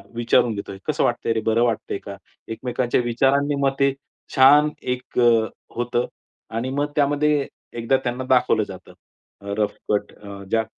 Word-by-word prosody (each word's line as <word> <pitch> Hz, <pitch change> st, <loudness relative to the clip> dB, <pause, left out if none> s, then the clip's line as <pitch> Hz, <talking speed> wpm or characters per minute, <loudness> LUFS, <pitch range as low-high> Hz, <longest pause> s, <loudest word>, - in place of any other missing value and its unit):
विचारून 120 Hz, -1 st, +2 dB
घेतोय. 100 Hz, -1 st, -6 dB
"कसं -, -, 0 dB
वाटतंय 115 Hz, -, 0 dB
रे? 110 Hz, -, -1 dB
बरं 115 Hz, +1 st, +3 dB
वाटतंय 110 Hz, -4 st, -1 dB
का?" 100 Hz, -, -7 dB, 0.4 s
एकमेकांच्या 125 Hz, +1 st, -1 dB
विचारांनी 135 Hz, +4 st, +1 dB
मग 135 Hz, 0 st, +2 dB
ते 140 Hz, -1 st, +3 dB, 0.4 s
छान 145 Hz, +3 st, +7 dB
एक 125 Hz, 0 st, -3 dB
अ, 115 Hz, -2 st, +5 dB, 0.3 s
होतं. 120 Hz, 0 st, 0 dB, 0.4 s
आणि 115 Hz, +3 st, -3 dB
मग 145 Hz, +2 st, -1 dB
त्यामध्ये 145 Hz, 0 st, +2 dB, 0.3 s
एकदा 120 Hz, +3 st, +1 dB
त्यांना 125 Hz, +2 st, -2 dB
दाखवलं 130 Hz, -1 st, +3 dB
जातं. -, -, -11 dB, 0.5 s
अ, 100 Hz, 0 st, -5 dB
रफ 105 Hz, -1 st, 0 dB, 0.2 s
कट 105 Hz, -, -1 dB
अ, 100 Hz, -1 st, -10 dB
ज्या 110 Hz, -1 st, +2 dB
120 Hz, 155 wpm, -22 LUFS, 110-135 Hz, 0.5 s, छान